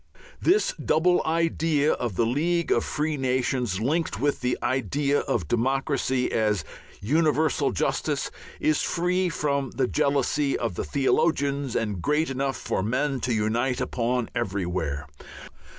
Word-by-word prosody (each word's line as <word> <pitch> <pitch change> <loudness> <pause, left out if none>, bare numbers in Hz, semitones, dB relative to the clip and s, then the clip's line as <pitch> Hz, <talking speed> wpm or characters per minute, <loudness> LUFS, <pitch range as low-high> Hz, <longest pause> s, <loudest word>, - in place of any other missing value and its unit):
This 425 +7 +3
double 175 +3 +3
idea 160 -2 +2
of 120 -6 -2
the 115 - +2
League 165 +8 0
of - - +3
Free 150 0 -1
Nations, 125 -5 0
linked 155 +9 -1
with 145 0 0
the 125 0 0
idea 140 +4 +1
of 90 -9 -1
democracy 130 - 0
as 105 -6 +1 0.4
universal 155 +5 +2
justice, - - -1 0.3
is 155 -1 +2
free 180 +2 0
from 140 -4 -1
the 135 - 0
jealousy 140 0 +1
of 115 -5 -2
the - - -3
theologians 140 -2 +1
and 105 -5 -1
great 150 - +1
enough 135 0 -1
for - - -2
men 130 +6 0
to 125 - -2
unite 115 +4 0
upon 120 -1 -1
everywhere. 90 -7 -2
135 Hz, 135 wpm, -26 LUFS, 115-150 Hz, 0.4 s, This